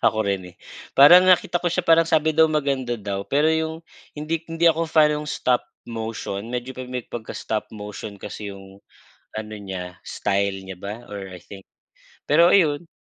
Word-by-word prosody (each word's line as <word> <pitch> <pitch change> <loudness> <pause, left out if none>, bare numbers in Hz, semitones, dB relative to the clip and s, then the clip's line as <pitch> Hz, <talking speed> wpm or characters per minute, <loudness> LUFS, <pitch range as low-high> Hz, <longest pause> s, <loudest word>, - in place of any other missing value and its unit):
Ako 110 - +2
rin, 95 -3 -2
eh, - - -29 0.4
parang 175 +7 +8
nakita 180 -1 +4
ko 175 - +2
siya 180 - +1
parang 165 0 +5
sabi 155 0 +2
daw 160 - +7
maganda 140 -5 0
daw, 100 -1 -4
pero 150 +3 +2
yung 160 0 -1 0.3
hindi 155 +2 -3
hindi 165 +1 -1
ako 165 +1 +2
fan 155 -2 +4
ng 150 - -5
stop 125 -4 0 0.2
motion 110 -2 -5
medyo 125 +1 -4
pa 130 - -6
may 125 -1 -6
pagka-stop 110 -1 -5
motion 105 -1 -8
kasi 105 +1 -7
yung 95 0 -13 0.5
ano 110 0 -5
niya, 90 -2 -7
style 100 -1 -2
niya 95 -1 -8
ba 105 +5 -7
or 100 -2 -7
I 90 - -9
think. 95 +2 -13 0.6
Pero 165 +4 +5
ayun 165 -4 +3
120 Hz, 175 wpm, -23 LUFS, 100-155 Hz, 0.6 s, parang